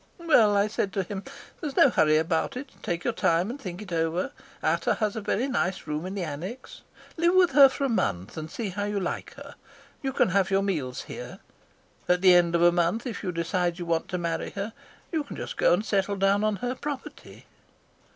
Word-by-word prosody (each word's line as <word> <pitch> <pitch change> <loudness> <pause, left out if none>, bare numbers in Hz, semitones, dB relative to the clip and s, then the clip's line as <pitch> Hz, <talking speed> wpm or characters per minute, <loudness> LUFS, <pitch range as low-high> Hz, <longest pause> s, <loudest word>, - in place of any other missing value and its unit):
"'Well,' 235 - +4
I 200 - +4
said 210 -2 -2
to 195 - 0
him, 195 +1 -6 0.4
'there's 295 -5 -5
no 275 - +7
hurry 155 -6 +4
about 160 +7 0
it. 265 +1 -7
Take 175 0 -3
your - - 0
time 170 +6 +1
and 275 +3 -8
think 185 -1 -6
it 190 - -12
over. 165 +8 0 0.3
Ata - - +1
has 215 -2 -1
a 220 - -3
very 230 +5 0
nice 190 -8 -1
room 155 +3 -3
in 190 - -5
the 195 - -2
annexe. 175 - -7 0.4
Live 340 +2 +3
with 365 -2 +5
her 275 0 +8
for 280 - -4
a - - +3
month, 100 - -1
and 155 0 -6
see 215 +4 -4
how 205 +2 -3
you 205 -1 -1
like 180 - -4
her. - - -11 0.5
You 270 - -2
can 255 - +2
have 190 0 +2
your 195 0 +2
meals 150 -11 -2
here. - - -8 0.7
And 180 - +5
at 180 - -7
the 185 -1 +7
end 170 -1 +4
of 170 - +3
a 175 - +7
month, 175 +7 0
if 245 - -5
you 185 - -2
decide 175 +1 -1
you 175 - -5
want 165 -1 0
to 180 - -3
marry 170 -2 -2
her, 205 +2 -4 0.4
you 320 -3 0
can 285 - -9
just - - -6
go - - +3
and 215 - +2
settle 200 -1 0
down 195 +1 +2
on 215 -1 +1
her 245 +6 -3
property.' 280 +1 -7
195 Hz, 230 wpm, -27 LUFS, 175-235 Hz, 0.7 s, her